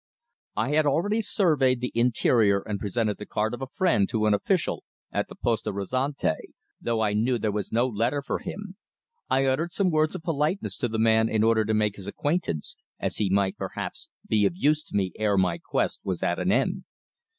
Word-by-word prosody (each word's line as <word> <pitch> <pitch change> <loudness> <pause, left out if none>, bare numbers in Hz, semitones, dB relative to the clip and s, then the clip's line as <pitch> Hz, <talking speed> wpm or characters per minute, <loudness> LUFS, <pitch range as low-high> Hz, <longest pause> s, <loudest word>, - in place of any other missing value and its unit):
I 110 +4 0
had 150 0 +3
already 205 +10 +1
surveyed 145 - +2
the 125 0 -3
interior 115 -4 +3
and 105 -2 -3
presented 105 +1 -1
the 105 - -6
card 110 +2 -1
of 120 - -6
a 135 - -3
friend 165 - +2
to 110 -3 0
an 105 - +4
official 170 - 0 0.3
at - - -1
the - - -11
Poste 115 -2 -1
Restante, 105 - -2 0.3
though 115 -1 0
I 105 -2 +1
knew 120 +4 +1
there 110 -1 -1
was 105 -1 -3
no 120 +2 +3
letter 125 +4 0
for - - -2
him. 200 -1 -7 0.5
I 135 +1 +3
uttered 155 +6 0
some 190 -3 +1
words 155 0 +2
of - - -6
politeness 165 +3 0
to 125 - 0
the 110 -1 -3
man 110 0 +4
in 110 -1 +1
order 110 -1 +4
to 110 +1 +1
make 105 -1 +1
his 100 -1 -9
acquaintance, 145 - -2 0.2
as - - -2
he 100 - +1
might, 95 0 +1
perhaps, - - -5 0.2
be 105 -1 +2
of - - -4
use 155 -3 +2
to - - -9
me 95 -2 +1
ere 105 -2 +2
my 95 - +2
quest - - -1
was - - -3
at - - 0
an - - +1
end. - - +1
115 Hz, 205 wpm, -26 LUFS, 105-150 Hz, 0.5 s, an